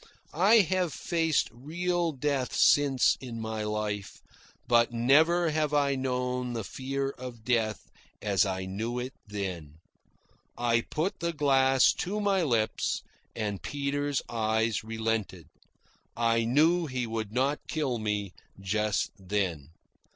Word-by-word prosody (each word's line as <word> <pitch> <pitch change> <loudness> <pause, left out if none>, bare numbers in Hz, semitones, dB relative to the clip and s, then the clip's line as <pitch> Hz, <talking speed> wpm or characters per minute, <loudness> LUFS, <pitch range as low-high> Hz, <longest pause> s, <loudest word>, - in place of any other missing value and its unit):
I 200 +8 +6
have 185 -4 0
faced 160 -8 +1
real 170 +7 -1
death 135 -2 -1
since 140 -3 +4
in 120 -3 -6
my 110 -1 -4
life, 105 -1 -3 0.5
but 120 0 +4
never 155 +8 +4
have 150 -1 0
I 140 -1 +3
known 125 -1 -2
the 115 -2 -3
fear 135 +5 -3
of 125 -4 -9
death 110 -3 0 0.3
as 100 -3 +2
I 95 -1 -2
knew 110 +6 -3
it 125 +1 -4
then. 90 -7 -5 0.8
I 120 -1 +2
put 160 - -3
the 170 0 -1
glass 135 -3 +4
to 200 +4 -2
my 200 -2 +2
lips, 115 -9 0 0.3
and 105 -3 -3
Peter's 145 0 -2
eyes 110 -1 0
relented. 110 -6 -2 0.7
I 115 -1 +2
knew 160 +7 +3
he 125 -3 -2
would 110 -2 -4
not 135 +5 +1
kill 140 -7 -1
me 105 -3 -2 0.3
just 105 +2 0
then. 95 -7 -2
125 Hz, 130 wpm, -29 LUFS, 110-145 Hz, 0.8 s, I